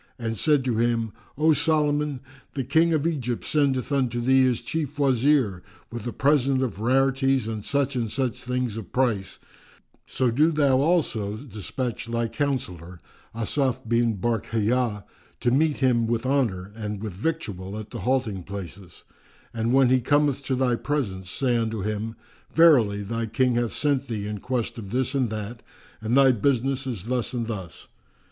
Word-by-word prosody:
and 115 -2 -3
said 145 +3 +2
to 120 -4 0
him, 115 -1 +1 0.3
"O 155 +1 +4
Solomon, 150 -2 +1 0.3
the 135 - -1
King 160 +6 +3
of 155 -2 +1
Egypt 130 -8 -2
sendeth 140 -3 +1
unto 130 -4 +1
thee 130 +2 +4
his 125 -3 +2
Chief 150 -3 -3
Wazir, 130 -7 +2 0.3
with 120 0 -6
a - - -2
present 135 -1 +2
of 115 -6 -3
rarities 135 +1 +2
and 110 -2 -4
such 140 +1 0
and 115 -3 -1
such 130 0 -2
things 125 -3 -2
of 110 -6 -8
price; 110 -8 0 0.7
so 125 -2 0
do 150 +7 +4
thou 140 -4 +3
also 135 - +1
despatch 115 0 -5
thy 115 0 -1
Counsellor 90 - -3 0.4
Asaf 120 +1 -1
bin 115 -1 +2
Barkhiyá 115 0 0 0.4
to 120 - +1
meet 150 +3 +2
him 120 -3 +3
with 115 +1 -1
honour 110 -9 0
and 105 -2 -4
with 105 -4 -4
victual 100 - -3
at 110 0 -8
the 120 - -6
halting 110 -3 0
places; 95 -1 -9 0.5
and 115 0 -1
when 135 -1 +5
he 130 0 +3
cometh 145 +1 +2
to 130 - 0
thy 125 -1 +1
presence, 110 -9 -2
say 125 +3 0
unto 110 -2 -2
him, 105 +2 -3 0.4
'Verily, 120 -12 +5
thy 115 +2 -3
King 125 +3 +1
hath 120 -1 0
sent 140 -2 0
thee 105 -3 -3
in 105 0 -4
quest 120 0 -3
of 100 -3 -8
this 130 +4 0
and 130 -4 +1
that 110 +2 -5 0.4
and 115 +4 +1
thy 135 -1 +7
business 135 +3 0
is 110 -7 -4
thus 125 +1 -2
and 120 -2 -2
thus. 95 -7 -7
120 Hz, 165 wpm, -25 LUFS, 110-135 Hz, 0.7 s, thy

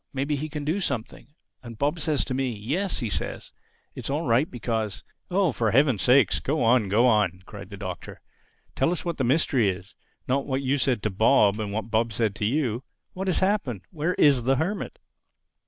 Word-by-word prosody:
Maybe 140 +2 -1
he 155 +2 -4
can 150 -1 -5
do 160 +7 0
something.' 130 - -4 0.3
And 115 -2 -10
Bob 145 +6 0
says 155 -3 0
to 130 - -3
me, 130 -2 -1
'Yes,' 145 - -2 0.2
says - - -5 0.4
he, - - -9
'it's - - -5
all 145 +4 -1
right 125 +5 +2
because—'" 110 -4 -3 0.3
"Oh, 185 -2 +2
for 115 -2 0
Heaven's 130 -1 +3
sake, 130 +2 +4
go 150 +1 0
on, 115 -3 +3
go 110 +5 +4
on!" 105 -6 +2
cried 100 -2 -10
the 100 - -9
Doctor. 95 -3 -7 0.6
"Tell 165 - +2
us 180 - -3
what 170 -1 -2
the 135 - 0
mystery 130 -4 +2
is—not 100 +8 -5
what 135 0 -1
you 135 +2 +1
said 125 -5 +1
to 110 - 0
Bob 105 0 +4
and 105 -2 -3
what 110 +2 -4
Bob 115 0 +1
said 110 -2 0
to 105 - -1
you. 125 -1 0 0.3
What 190 +1 -4
has 185 - +2
happened? 155 - -1
Where 165 +2 -1
is 135 -5 +4
the 135 +1 +3
Hermit?" 180 +9 -3
130 Hz, 200 wpm, -25 LUFS, 110-150 Hz, 0.6 s, sake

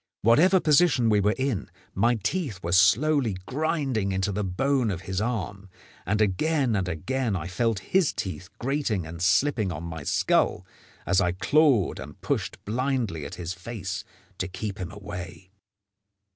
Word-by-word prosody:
Whatever 165 - +5
position 150 -7 +4
we 105 - +4
were 105 +2 +2
in, 130 -6 -2 0.2
my 115 +5 +3
teeth 135 - -2
were 85 - -2
slowly 110 - +4
grinding 135 -8 -1
into 95 +1 0
the 105 +2 -2
bone 125 +6 +1
of 90 -4 -3
his 95 +1 -3
arm, 105 -4 -3 0.4
and 105 +3 +1
again 125 - +1
and 95 -3 0
again 115 - -1
I 85 -3 -3
felt 115 +4 0 0.2
his 185 -5 +4
teeth 95 -1 -5
grating 120 - -1
and 80 +1 -8
slipping 100 - +2
on 80 0 -5
my 80 -2 -6
skull 70 - +1 0.4
as 95 0 +3
I 90 -2 +1
clawed 135 - +3
and - - -9
pushed - - -2
blindly 115 - -1
at - - -8
his 90 0 -4
face 95 0 -5 0.4
to 95 - -1
keep 100 +2 -5
him 90 -3 -5
away. 95 -2 -8
105 Hz, 160 wpm, -26 LUFS, 95-130 Hz, 0.4 s, Whatever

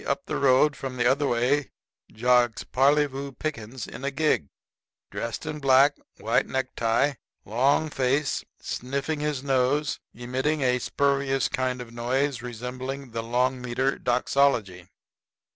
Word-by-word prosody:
Up - - -1
the - - -2
road 140 +2 +4
from 130 -2 -6
the 120 - +1
other 140 +3 +3
way 125 +4 +1 0.4
jogs 120 0 +2
Parleyvoo 140 0 +1
Pickens 125 -5 -5
in - - -9
a 140 - 0
gig, 140 - +1 0.6
dressed 115 +6 -4
in 150 0 -4
black, 135 +1 +5 0.2
white - - +1
necktie, 130 +1 0 0.3
long 135 +8 +2
face, 135 +3 0 0.2
sniffing 140 +4 -3
his 150 -3 -2
nose, 135 +2 +1 0.2
emitting 130 +5 -1
a 125 -1 +2
spurious 140 +1 +1
kind 130 -1 -2
of 115 -1 -10
noise 130 +3 -1
resembling 125 +2 -6
the 115 0 -3
long 125 +3 0
meter 130 +2 -1
doxology. 120 -7 +1
130 Hz, 130 wpm, -26 LUFS, 125-140 Hz, 0.6 s, black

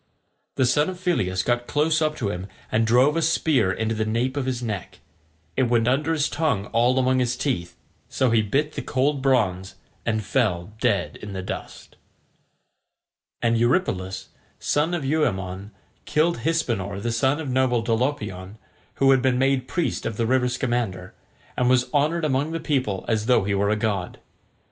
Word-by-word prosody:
The 130 - +2
son 150 +6 +2
of 185 - -6
Phyleus 95 - 0
got 120 0 0
close 155 +2 +1
up 155 -1 +1
to 115 -9 -2
him 90 0 -5 0.2
and 115 +1 +2
drove 130 +6 +4
a 165 - +1
spear 155 - +2
into 110 +4 -1
the 110 0 -1
nape 115 +5 -1
of 140 -2 -2
his 125 -2 -2
neck: 105 -5 -5 0.6
it 130 -3 +1
went 120 -1 +2
under 145 +5 +1
his 155 -2 +1
tongue 140 -11 0
all 120 +3 +3
among 130 0 +2
his 125 -1 0
teeth, 125 -11 -2 0.3
so 130 -3 +1
he 115 -1 +4
bit 140 +9 0
the - - -4
cold 140 +2 0
bronze, 100 -9 +1 0.3
and 110 -1 -1
fell 100 -5 0
dead 105 -7 0
in 105 -1 -8
the 95 -1 -4
dust. - - -8 1.5
And 115 -1 +2
Eurypylus, 115 - 0 0.3
son 155 +4 0
of 155 -5 -3
Euaemon, 100 - -1 0.4
killed 160 -1 +1
Hypsenor, 115 - -1
the 120 +3 -2
son 130 +6 +1
of 155 -4 -4
noble 125 -2 +2
Dolopion, 115 -5 -2 0.4
who 135 0 +4
had 135 -1 +4
been 130 -1 +2
made 135 -1 +1
priest 170 -1 -1
of 110 -2 -5
the 115 - +1
river 125 +1 +2
Scamander, 120 -8 -2 0.4
and 125 0 +2
was 125 +2 +2
honoured 155 +3 +1
among 145 +2 0
the 165 - -2
people 130 - -1
as 110 -1 0
though 125 -5 +4
he 100 +1 -1
were 100 +1 +1
a 105 - +2
god. 105 -4 -2
125 Hz, 175 wpm, -24 LUFS, 105-140 Hz, 1.5 s, drove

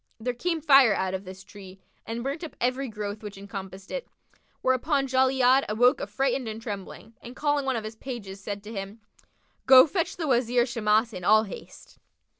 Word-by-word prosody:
there 245 +2 -2
came 330 +7 -2
fire 275 -7 +6
out 190 0 -2
of 190 +1 -4
this 190 +1 -10
tree 195 -1 -13 0.3
and 230 +1 -4
burnt 280 +6 -4
up 325 - -8
every 255 +2 0
growth 210 -2 -6
which 210 -2 -8
encompassed 195 -1 -9
it; - - -4 0.5
whereupon 270 +2 +1
Jali'ad 260 0 +3
awoke 245 +4 +3
affrighted 250 +4 -1
and 220 0 -5
trembling, 215 0 -8
and 245 +2 -10
calling 290 -1 0
one 265 - +1
of 225 - -3
his 215 +1 -8
pages 210 -7 -7
said 205 -1 -5
to 215 +2 -9
him, 195 +2 -6 0.7
"Go 260 -1 +9
fetch 335 +1 -2
the 325 -3 -3
Wazir 245 -1 +2
Shimas 225 -2 +1
in 180 -2 -7
all 215 +4 +5
haste." 205 - -11
235 Hz, 185 wpm, -26 LUFS, 205-265 Hz, 0.7 s, Go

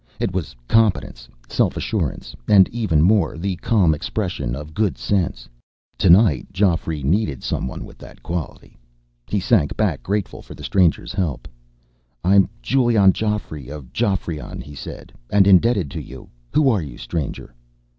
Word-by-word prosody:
It 95 - -1
was 90 -9 -4
competence, 95 - +1 0.2
self - - 0
assurance, - - -3
and, 95 -3 +6
even 105 -10 +1
more, 100 -1 +3
the 95 +2 -2
calm 95 -5 +2
expression 75 - -3
of 75 +2 -8
good 105 0 0
sense. 85 -11 -1 0.5
Tonight, 90 - +4
Geoffrey 85 -6 0
needed 75 - 0
someone 65 - -3
with - - -15
that - - -14
quality. 85 -4 -6 0.5
He 105 - 0
sank 95 - +1
back, - - 0
grateful 100 -2 -3
for - - -12
the - - -11
stranger's 90 -5 +1
help. 85 -9 -2 0.8
"I'm 95 +1 +4
Giulion 115 -8 +4
Geoffrey 105 - -3
of 70 -4 -9
Geoffrion," 85 -6 -2
he 75 - -11
said, 70 -3 -9 0.2
"and 100 -1 +4
indebted 100 - +4
to - - -5
you. - - -11 0.3
Who 150 -3 +5
are 105 -5 +1
you, 70 -6 -8
stranger?" 75 -7 -5
90 Hz, 145 wpm, -21 LUFS, 75-105 Hz, 0.8 s, and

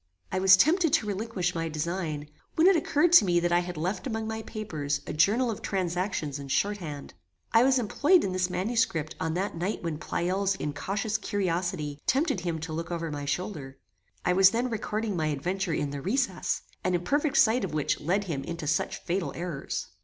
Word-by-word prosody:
I 185 - 0
was 190 0 +7
tempted 325 - +3
to 325 - +3
relinquish 200 -3 -2
my 165 -1 -2
design, 155 -1 -3 0.3
when 320 - +4
it 385 0 +7
occurred 315 +1 +2
to 345 - +9
me 175 -3 +3
that 175 0 0
I 175 - +4
had 175 -1 -5
left 185 - -2
among 220 -2 -3
my 220 0 -3
papers 155 -11 -3
a - - -5
journal 225 +10 +3
of 215 - -6
transactions 180 -5 -2
in 140 - -7
shorthand. 155 - -2 0.4
I 230 +1 +6
was 265 0 +4
employed 295 - +3
in 190 - -1
this 185 0 0
manuscript 180 -6 0
on 160 0 -1
that 190 +1 -2
night 180 +5 -3
when 160 -3 -3
Pleyel's 190 +4 0
incautious 195 +8 -2
curiosity 175 -8 -2
tempted 270 - +2
him 170 -2 -2
to 160 0 -5
look 165 +1 -4
over 165 -2 -3
my 145 -1 -4
shoulder. 145 -3 -4 0.5
I 180 - +3
was 190 +1 +7
then 240 +4 -1
recording 215 -1 -2
my 160 -2 0
adventure 175 +6 -2
in 145 -3 -1
THE 140 -1 -5
RECESS, 200 - -1 0.2
an 185 0 +1
imperfect 285 - 0
sight 225 +1 +4
of 170 -5 -3
which 150 - 0
led 185 +7 0
him 155 -8 -3
into 170 +1 -5
such 150 +1 -1
fatal 180 +1 -1
errors. 170 - -4
185 Hz, 195 wpm, -28 LUFS, 160-215 Hz, 0.5 s, to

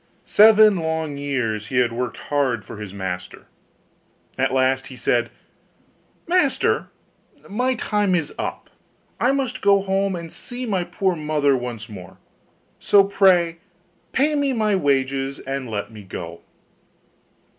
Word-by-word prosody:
Seven 215 -1 +6
long 160 -2 -2
years 120 -7 -2
he 125 - -3
had 125 -1 +3
worked 120 0 -3
hard 130 -7 -1
for 105 - -9
his 105 -2 -7
master. 90 -2 -6 0.9
At - - 0
last 130 0 +1
he 130 - -10
said, 120 0 0 1.0
'Master, 345 -5 +1 0.6
my 250 +5 0
time 210 -4 0
is 160 -4 -2
up; - - -5 0.5
I 255 - +3
must 260 -2 -2
go 200 0 +4
home 195 0 0
and 170 -2 -7
see 250 0 -7
my 195 -6 0
poor 190 0 0
mother 150 -3 +1
once 120 -3 -5
more: 95 -4 -11 0.6
so 200 -1 +5
pray 180 -4 +3 0.5
pay 295 +3 +2
me 285 -2 +1
my 215 -3 +1
wages 135 -3 0
and 135 -2 -5
let 105 0 -4
me 110 -1 -10
go. 85 -3 -8
145 Hz, 135 wpm, -22 LUFS, 120-200 Hz, 1.0 s, Seven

